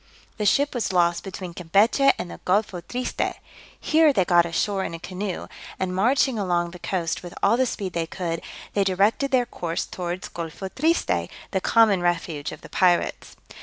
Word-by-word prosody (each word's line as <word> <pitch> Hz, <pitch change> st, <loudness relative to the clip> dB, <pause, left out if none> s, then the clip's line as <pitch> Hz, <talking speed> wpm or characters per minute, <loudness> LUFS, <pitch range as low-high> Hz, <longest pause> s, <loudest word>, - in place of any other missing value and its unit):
The 210 Hz, -, 0 dB
ship 285 Hz, +5 st, +3 dB
was 240 Hz, -6 st, -1 dB
lost 175 Hz, -2 st, +2 dB
between 185 Hz, -2 st, -7 dB
Campechy 200 Hz, -, +4 dB
and 175 Hz, -, -5 dB
the -, -, -9 dB
Golpho 190 Hz, -1 st, +1 dB
Triste: 250 Hz, +1 st, -2 dB, 0.4 s
here 315 Hz, -1 st, +4 dB
they 190 Hz, -9 st, +2 dB
got 170 Hz, -1 st, +4 dB
ashore 195 Hz, +3 st, 0 dB
in 170 Hz, -, -4 dB
a -, -, -8 dB
canoe, 185 Hz, +2 st, -4 dB, 0.3 s
and, 185 Hz, -1 st, -2 dB
marching 245 Hz, +4 st, +2 dB
along 175 Hz, -3 st, 0 dB
the 180 Hz, -, -11 dB
coast 170 Hz, -1 st, -2 dB
with 175 Hz, -1 st, -9 dB
all 205 Hz, +3 st, +5 dB
the 255 Hz, +1 st, +2 dB
speed 195 Hz, -6 st, -4 dB
they 165 Hz, -1 st, -1 dB
could, 165 Hz, -1 st, -3 dB, 0.3 s
they 200 Hz, -, +2 dB
directed 200 Hz, +8 st, +2 dB
their 255 Hz, -2 st, +3 dB
course 170 Hz, -7 st, -3 dB
towards 180 Hz, 0 st, -5 dB
Golpho 170 Hz, +3 st, -6 dB
Triste, 320 Hz, -, +1 dB, 0.2 s
the 190 Hz, -, 0 dB
common 215 Hz, -5 st, +4 dB
refuge 170 Hz, -4 st, -1 dB
of -, -, -10 dB
the -, -, -12 dB
pirates. 180 Hz, -2 st, +1 dB
190 Hz, 180 wpm, -24 LUFS, 175-220 Hz, 0.4 s, all